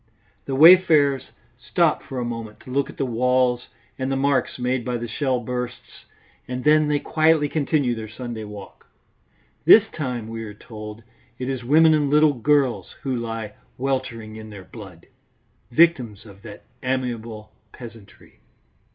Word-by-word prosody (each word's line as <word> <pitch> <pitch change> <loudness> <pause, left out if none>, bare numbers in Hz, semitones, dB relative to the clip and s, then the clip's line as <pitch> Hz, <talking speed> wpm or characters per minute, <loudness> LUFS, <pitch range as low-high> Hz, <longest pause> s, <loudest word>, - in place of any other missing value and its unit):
The 135 - -3
wayfarers 155 -4 +6 0.3
stop - - +1
for 135 - -8
a 125 - -2
moment 115 -2 -6
to 130 - -11
look 140 +1 0
at - - -12
the 135 - -1
walls 125 0 +1 0.3
and 130 +1 -2
the - - 0
marks 140 0 0
made 125 0 -1
by 125 0 -2
the 120 0 -5
shell 130 +2 -1
bursts, 125 +1 -6 0.4
and 125 0 -5
then 150 0 +4
they 150 0 +1
quietly 155 0 +2
continue 145 -4 0
their 110 -2 -7
Sunday 115 -1 -7
walk. 105 -2 -11 0.8
This - - +8
time, 125 -6 -4
we 115 0 -6
are 105 -2 -9
told, 105 0 -10 0.3
it 125 - -5
is 130 -2 -3
women 155 +5 +5
and 150 -2 +1
little 150 +1 +4
girls 135 0 0
who 135 -3 -1
lie 115 -3 -5 0.2
weltering 120 -5 -3
in 110 0 -10
their 100 -3 -10
blood, 95 -7 -12 0.6
victims 120 -8 +2
of 100 -2 -15
that 105 -2 -11 0.2
amiable 115 -4 -4 0.2
peasantry. 115 -4 -14
125 Hz, 155 wpm, -23 LUFS, 115-140 Hz, 0.8 s, This